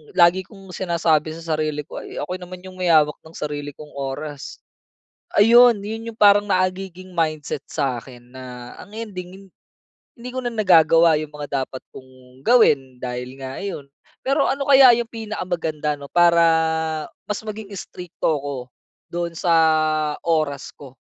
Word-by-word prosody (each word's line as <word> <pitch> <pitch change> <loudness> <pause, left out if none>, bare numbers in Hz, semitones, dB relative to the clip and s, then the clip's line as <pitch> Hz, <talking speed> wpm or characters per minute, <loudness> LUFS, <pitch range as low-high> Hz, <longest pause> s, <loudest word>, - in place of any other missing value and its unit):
lagi 180 +1 +4
kong 195 -3 -14
sinasabi 165 -4 0
sa 165 - -10
sarili 155 -1 -2
ko, 145 - -8
"Ay - - -10
ako 180 +5 -4
naman 180 0 -10
'yong 185 -1 -11
may 180 - 0
hawak 155 -2 +4
ng 160 - -16
sarili 145 -1 -5
kong 150 -1 -12
oras." 140 +1 -6 0.8
Ayun, 230 0 +6
yun 225 +2 -5
yung - - -21
parang 205 -1 +5
nagiging 185 0 -2
mindset 155 -4 -2
sa 130 -3 -2
akin 120 -1 -15
na, 125 -1 -9
ang - - -12
ending 190 -3 -8 0.7
hindi 245 +2 -8
ko 255 - -3
na 245 - -2
nagagawa 170 -6 +5
yung 155 - -6
mga 145 -2 -3
dapat 130 - -9
kong 130 0 -15
gawin 135 - +3
dahil 125 0 -5
nga 135 +3 -7
ayun. 195 -8 -5 0.4
Pero 275 +2 +2
ano 275 +1 -1
kaya 270 -2 +8
yung 240 - -1
pinakamaganda 175 -9 -3
'no, 140 - -9
para 170 -1 +5 0.9
mas 210 - -1
maging 215 -1 -7
strikto 180 0 -8 0.2
ako 140 -1 -4 0.6
doon 170 -1 -2
sa 175 -2 +1 0.7
oras 155 -4 -1
ko? 135 -3 -14
170 Hz, 155 wpm, -22 LUFS, 145-195 Hz, 0.9 s, kaya